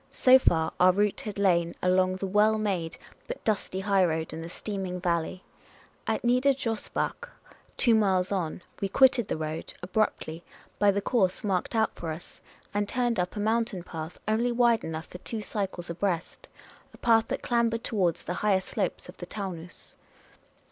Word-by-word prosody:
So 260 0 +6
far, 160 -9 +2
our 185 +1 +7
route 205 +2 +1
had 210 -2 -6
lain 170 -4 +2
along 185 0 +3
the 190 - -4
well 210 +3 +3
made 185 -6 -2 0.3
but - - -6
dusty 195 -3 -1
highroad 180 -6 +1
in 160 - -5
the 165 - -7
steaming 190 -1 -4
valley; 175 +1 -1 0.6
at - - 0
Nieder 250 +3 +4
Josbach, 250 - -3 0.5
two 235 - +5
miles 190 -4 +2
on, 180 -3 -2 0.2
we 195 - 0
quitted 260 -2 +4
the - - -2
road 155 0 -5
abruptly, 180 -4 -1 0.4
by 205 - +5
the 200 0 +1
course 195 -7 +1
marked 195 +2 -1
out 220 -1 +2
for 165 - -6
us, 160 +2 -10 0.3
and 205 0 0
turned 240 -4 0
up 180 0 -1
a - - -3
mountain 220 -3 0
path, 160 -1 -7
only 230 +3 +2
wide 235 -1 +3
enough 160 0 -4
for 180 - -11
two 220 +2 -5
cycles 190 -5 -3
abreast 175 -1 -3 0.2
— - - -27
a - - -16
path 225 -2 +3
that - - -3
clambered 235 -1 +1
towards 185 -7 0
the 180 - -3
higher 205 -3 +3
slopes - - -3
of - - -12
the - - -8
Taunus. 180 -5 -7
195 Hz, 175 wpm, -28 LUFS, 175-220 Hz, 0.6 s, our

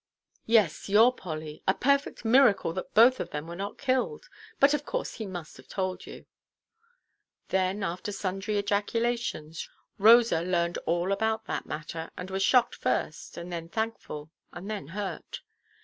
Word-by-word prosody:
"Yes, 215 -7 +3
your 225 +5 +6
Polly. 155 -7 -7
A 190 - +4
perfect 280 -2 +1
miracle 225 -8 +4
that 185 - -6
both 245 +4 +7
of - - -3
them 150 +1 -5
were 170 +1 -7
not 200 +3 -5
killed. 275 - -1 0.3
But, 280 +1 +6
of 295 -1 0
course, - - -3
he 220 - -6
must 175 -4 -7
have - - -16
told 185 -1 -3
you." - - -10 1.2
Then, 190 +2 0
after 185 +4 -3
sundry 195 +1 -2
ejaculations, 205 -5 -1 0.3
Rosa 225 -4 +6
learned 170 -1 0
all 175 +3 +1
about 220 +2 0
that - - -4
matter, 160 +1 -5
and 185 +1 -6
was 190 0 -1
shocked 245 +5 +4
first, - - -2
and 175 +1 -6
then 165 -1 -5
thankful, 195 -9 -4 0.2
and 190 +5 -7
then 200 -10 -5
hurt. 190 +1 -5
195 Hz, 155 wpm, -28 LUFS, 170-230 Hz, 1.2 s, both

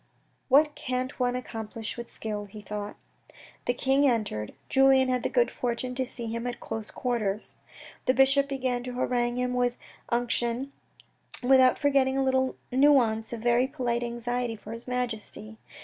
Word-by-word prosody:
"What 295 +3 +5
can't 255 -3 -3
one 250 0 +1
accomplish 225 -3 -5
with 235 -1 -7
skill," 210 -2 -4
he 205 +1 -11
thought. 205 0 -5 0.7
The 245 - +1
king 270 +3 +3
entered. 205 - -2
Julien 265 -1 +5
had 250 -1 +1
the - - -1
good 245 -1 +2
fortune 250 +1 -2
to 260 0 -2
see 240 -2 -6
him 230 +2 -3
at 245 - -4
close 220 -1 -5
quarters. 220 -5 -2 0.5
The 255 - +3
bishop 275 +1 +4
began 255 -3 -1
to 250 - -5
harangue 245 -1 0
him 250 0 0
with 245 -1 +1 0.3
unction, 240 +2 0 0.7
without 260 0 +6
forgetting 275 -2 +2
a 270 - +2
little 260 0 +1 0.2
nuance 250 -5 +4
of 235 -2 -5
very 240 +2 +3
polite 240 -4 -1
anxiety 240 0 -2
for 215 - -10
his 230 +2 -7
Majesty. 220 -3 -4
245 Hz, 160 wpm, -28 LUFS, 230-260 Hz, 0.7 s, without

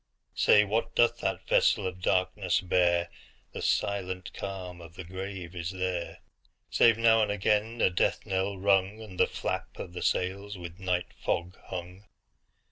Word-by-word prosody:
Say, 105 - +5
what 110 +3 -1
doth 120 - +4
that - - -2
vessel 100 - +3
of 90 -1 -4
darkness 95 0 +1
bear? 85 -1 +2 0.4
The - - -6
silent 95 -2 -1
calm 90 -3 -6
of 85 0 -12
the 90 - -7
grave 95 0 -7
is 85 -1 -3
there, 90 -2 -3 0.5
Save 115 -1 +5
now 115 -1 +5
and 105 -1 +1
again 105 +3 0
a - - +4
death 90 - 0
knell 95 0 -1
rung, 100 +2 +2
And 105 -5 -10
the - - +5
flap - - -4
of 85 - -7
the 90 - -6
sails 100 +2 -1
with 85 0 -9
night 90 -2 -1
fog 85 +3 -2
hung. 90 +2 -7
95 Hz, 160 wpm, -29 LUFS, 90-100 Hz, 0.5 s, Say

